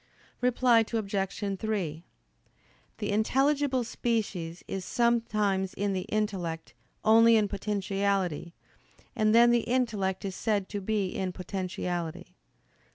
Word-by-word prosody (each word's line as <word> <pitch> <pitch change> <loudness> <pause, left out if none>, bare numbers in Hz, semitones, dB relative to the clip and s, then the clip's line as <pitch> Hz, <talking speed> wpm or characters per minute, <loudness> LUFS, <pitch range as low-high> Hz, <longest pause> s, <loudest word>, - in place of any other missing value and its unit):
Reply 245 -2 +4
Obj. 200 -2 -2
3: 180 -8 -2 0.9
The 205 -2 -2
intelligible 270 +4 +2
species 205 -8 -2
is 190 -1 -4
sometimes 215 -5 +1
in 200 0 -1
the 185 -1 -3
intellect 190 -6 -2 0.3
only 230 +1 +7
in 215 -2 +3
potentiality, 195 -4 -1 0.6
and 215 0 +3
then 240 +1 +7
the 240 - +4
intellect 220 -6 -1
is 190 -1 -4
said 205 -3 -1
to 205 -1 -4
be 200 -1 0
in 185 0 -3
potentiality. 180 -2 -4
205 Hz, 110 wpm, -28 LUFS, 185-225 Hz, 0.9 s, only